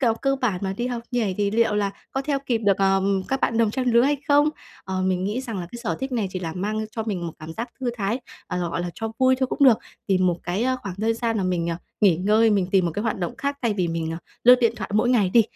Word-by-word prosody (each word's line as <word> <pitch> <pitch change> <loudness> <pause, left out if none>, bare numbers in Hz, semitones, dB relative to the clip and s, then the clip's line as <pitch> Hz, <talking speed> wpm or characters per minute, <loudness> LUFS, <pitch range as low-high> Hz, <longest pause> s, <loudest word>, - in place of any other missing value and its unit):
nào 230 -4 +3
cơ 275 +3 0
bản 220 -9 -1
mà 190 - -1
đi 240 - -1
học 240 -2 -3
nhảy 225 -7 0
thì 200 -1 +1
liệu 220 0 +2
là 200 -1 +1 0.2
có 270 - -2
theo 280 0 0
kịp 235 -3 +1
được, 200 -3 +2
ờ, 195 0 +3 0.3
các 270 0 -1
bạn 230 - +1
đồng 225 -2 +3
trang 255 +2 -2
lứa 235 +1 +6
hay 285 +2 +2
không?". 290 +1 +5 0.4
Ờ, 185 0 -2
mình 185 0 0
nghĩ 215 +6 -1
rằng 230 -7 -5
là 175 - -4
cái 240 - -6
sở 220 - -1
thích 265 0 -3
này 215 -6 0
chỉ 185 - -4
là 165 -3 -4
mang 215 +4 -2
cho 225 0 -3
mình 190 -6 -3
một 165 - -5
cảm 155 +1 -8
giác 235 +6 -5
thư 245 -2 0
thái, 220 +5 -1 0.3
ờ, 180 - -3
gọi 170 - -2
là, 175 0 -3
cho 225 0 -4
vui 260 0 +4
thôi 260 0 0
cũng 280 - +1
được, 240 -5 +7 0.3
tìm 185 -2 +2
một 175 -1 +2
cái, 180 +6 -2
a, 260 0 +1
khoảng 195 -7 -7
thời 220 +4 0
gian 230 -1 -1
mà 195 - 0
mình, 170 -2 0
à, 165 - -2 0.2
nghỉ 195 -6 +5
ngơi, 215 +5 +3
mình 200 -3 +2
tìm 190 -2 +3
một - - 0
cái 205 - -2
hoạt 225 -3 -1
động 175 -2 -3
khác 280 0 -3
thay 225 -3 +1
vì 180 -3 0
mình, 165 -1 -2
à, 165 - -4 0.3
lướt 250 +1 +10
điện 230 -2 +3
thoại 190 -3 -5
mỗi 220 +3 +3
ngày 210 -7 +3
đi. 230 - +8
215 Hz, 300 wpm, -24 LUFS, 185-245 Hz, 0.4 s, lướt